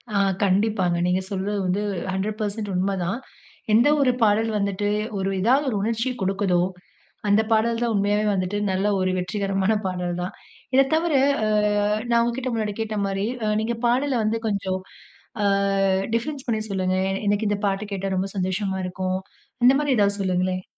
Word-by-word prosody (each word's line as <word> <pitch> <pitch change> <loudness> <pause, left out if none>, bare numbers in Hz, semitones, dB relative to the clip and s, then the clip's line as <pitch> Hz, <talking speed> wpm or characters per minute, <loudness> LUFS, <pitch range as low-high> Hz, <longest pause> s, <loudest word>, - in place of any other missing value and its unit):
ஆ. - - +3 0.3
கண்டிப்பாங்க. 190 -2 +2
நீங்க 185 +1 +1
சொல்றது 200 +2 -2
வந்து, 195 +3 0 0.3
100% 210 +1 -3
உண்ம 190 +2 +1
தான். 230 +8 -2 0.5
எந்த 235 +6 +5
ஒரு 255 -2 +4
பாடல் 220 +1 +3
வந்துட்டு, 200 0 -1 0.3
ஒரு 195 0 -1
ஏதாவது 265 +7 +3
ஒரு 215 - -2
உணர்ச்சி 230 +4 0
கொடுக்குதோ, 190 -2 +1 0.7
அந்த 205 +2 +5
பாடல் 230 +1 +2
தான் 230 -2 +1
உண்மையாவே 205 +1 +1
வந்துட்டு, 185 +2 -1
நல்ல 190 +2 0
ஒரு 185 0 +1
வெற்றிகரமான 195 +2 0
பாடல் 180 -1 -2
தான். 180 - -4 0.4
இத 270 0 +6
தவற, 325 -1 +1 0.3
அ - - +1 0.6
நான் 235 0 +4
உங்ககிட்ட 250 +2 -2
முன்னாடி 210 -2 -2
கேட்ட 215 -1 -3
மாரி, 195 +2 -1 0.3
நீங்க 235 +1 -1
பாடல 265 +3 +1
வந்து 225 +1 0
கொஞ்சம் 190 -2 -1 0.6
அ - - +2 0.7
டிஃபரன்ஸ் 270 +3 -3
பண்ணி 220 -2 0
சொல்லுங்க? 185 -1 0 0.3
எனக்கு 205 +1 +1
இந்த 205 - 0
பாட்டு 200 +2 -2
கேட்டா, 195 0 -2
ரொம்ப 195 +1 -1
சந்தோஷமா 190 +1 -1
இருக்கும். 185 +1 -2 0.5
இந்த 260 - +8
மாரி 290 -3 +1
ஏதாவது 200 0 +2
சொல்லுங்களேன்? 185 0 0
205 Hz, 155 wpm, -24 LUFS, 190-225 Hz, 0.7 s, இந்த